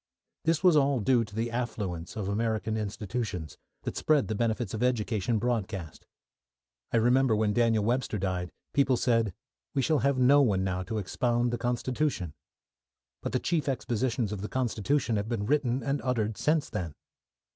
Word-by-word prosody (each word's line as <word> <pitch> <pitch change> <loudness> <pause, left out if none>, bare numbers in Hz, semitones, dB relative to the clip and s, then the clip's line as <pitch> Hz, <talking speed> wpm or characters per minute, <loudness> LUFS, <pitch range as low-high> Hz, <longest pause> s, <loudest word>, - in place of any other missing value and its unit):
This 165 +1 +2
was 180 -3 +6
all 140 -3 +3
due 120 +2 +3
to 105 -2 -11
the 115 +1 -1
affluence 105 -8 -3
of 105 -3 -3
American 110 0 -1
institutions, 105 -5 -4 0.2
that - - -4
spread 150 -6 +2
the - - 0
benefits 115 -1 -1
of 110 - -3
education 115 -3 +1
broadcast. 105 -7 -3 0.8
I - - +3
remember 125 +1 +4
when 105 -1 +1
Daniel 115 -2 +3
Webster 120 0 0
died, 90 -2 -2 0.2
people 135 -3 +3
said, 115 -4 +2 0.4
"We 135 - +2
shall 155 +2 +2
have 140 -1 +2
no 135 +3 +6
one 100 -8 +2
now 90 -1 -1
to 110 +4 -4
expound 120 +4 0
the 120 - -1
constitution," 120 - -1 0.9
but - - -3
the 130 - +2
chief 155 -2 0
expositions 120 -3 -1
of 105 -2 -4
the 105 - -4
constitution 125 0 0
have 100 +2 -2
been 110 -4 -1
written 135 -1 +1
and 140 0 -1
uttered 115 -4 0
since 155 +4 +1
then. 85 -9 -4
115 Hz, 170 wpm, -29 LUFS, 105-130 Hz, 0.9 s, was